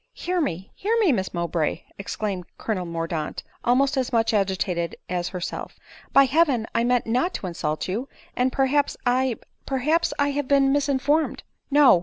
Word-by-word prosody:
" - - -51
Hear 360 0 +1
me, 190 - -3
hear 445 +4 0
me, 405 -8 +4
Miss 190 -7 -1
Mowbray 170 -2 -1
!" - - -30
exclaimed 195 -2 -3
co 220 - -2
lonel 180 -3 -3
Mordaunt, 165 -2 -3 0.2
almost 270 +4 +3
as 260 -1 0
much 225 -1 +2
agitated 190 -4 0 0.2
as 175 -1 -1
herself; 180 -2 -5 0.2
" - - -22
by 275 - +7
heaven 275 -4 +3
I 230 - +2
meant 245 0 +2
not 250 +10 0
to - - -4
insult 155 -3 -2
you! 225 +9 -3 0.3
and 255 +1 +2
perhaps 275 +2 +1
I 250 0 +2 0.2
— - - -46
per 270 - 0
haps 315 +6 +2
I 285 0 +2
have 285 -1 -2
been 275 -1 +4
misinformed 285 +2 +1 0.2
— - - -50
No 270 -11 +7
245 Hz, 195 wpm, -24 LUFS, 185-280 Hz, 0.3 s, by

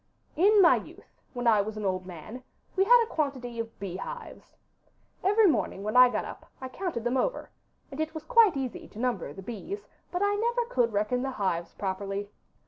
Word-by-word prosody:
'In 400 +4 +6
my 335 - +7
youth, - - -11 0.2
when 245 -1 -4
I 220 -3 +5
was 215 +1 -5
an 210 - -4
old 185 -1 -1
man, 185 +8 -9 0.3
we 385 - +4
had 480 +2 +7
a 450 - -8
quantity 260 -6 -2
of 230 0 -6
beehives. 200 - -7 0.7
Every 415 +3 +4
morning 290 - +1
when 215 +2 -3
I 250 0 +9
got - - -2
up - - -10
I 260 - -6
counted 295 - -4
them 240 +2 0
over, - - -1 0.4
and 275 - -8
it 315 +1 -2
was 315 - -5
quite 460 - +5
easy 260 -3 -4
to - - -16
number 235 - -1
the 190 +6 -10
bees, 335 - -6 0.3
but 360 +2 -1
I 405 0 +2
never 475 +3 0
could 245 - +1
reckon 215 +4 0
the 270 - -2
hives 185 -8 -2
properly. 195 +1 -3
250 Hz, 200 wpm, -28 LUFS, -, 0.7 s, I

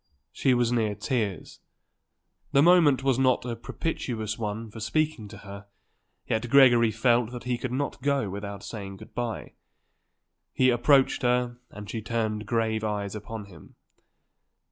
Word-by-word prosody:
She 130 -3 +2
was 120 -1 +1
near 110 -4 0
tears. 105 - -3 0.9
The 140 - +5
moment 160 -7 +5
was 135 -2 +2
not 130 -2 +2
a 120 -1 -3
propitious 115 -3 -4
one 110 0 -5
for 110 - -9
speaking 125 0 -1
to - - -11
her; 100 0 -11 0.6
yet 115 +2 -1
Gregory 120 -4 +6
felt 115 +1 +2
that 125 -1 -7
he 125 0 -1
could 125 +1 -5
not 140 +2 -3
go 140 -4 +1
without 100 0 -6
saying 100 -3 -7
good - - -14
bye. 120 -2 -4 1.0
He 130 -1 +4
approached 130 +3 +3
her 125 -1 +1
and 105 0 -10
she 115 - -4
turned 110 -2 -2
grave 110 -1 0
eyes 105 -2 -2
upon 110 0 -7
him. 90 -6 -16
115 Hz, 150 wpm, -27 LUFS, 105-125 Hz, 1.0 s, Gregory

